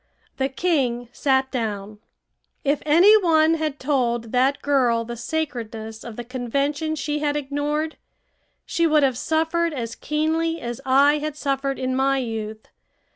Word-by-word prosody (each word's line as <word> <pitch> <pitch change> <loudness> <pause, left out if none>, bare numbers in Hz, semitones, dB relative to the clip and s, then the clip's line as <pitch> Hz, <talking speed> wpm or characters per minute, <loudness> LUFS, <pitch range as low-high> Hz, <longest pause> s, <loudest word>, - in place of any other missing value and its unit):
The 265 0 0
king 265 -6 0
sat 265 0 +1
down. 210 -3 -4 0.6
If 285 0 +1
any 350 +8 +7
one 320 -2 +4
had 310 -3 -2
told 240 -5 0
that 260 +3 +2
girl 245 -5 +2
the 240 +1 -6
sacredness 225 -5 -4
of 235 -2 -8
the 240 - -5
convention 280 +6 -2
she 295 0 -2
had 295 0 0
ignored, 295 +2 -2 0.7
she 335 0 +1
would 305 -2 +4
have 265 -2 +2
suffered 320 +5 0
as 230 -3 -4
keenly 320 +4 -1
as 240 -1 -5
I 285 +3 +5
had 305 0 -4
suffered 275 -1 -1
in 255 0 -2
my 270 +1 +2
youth. 220 -3 -4
275 Hz, 145 wpm, -23 LUFS, 240-305 Hz, 0.7 s, any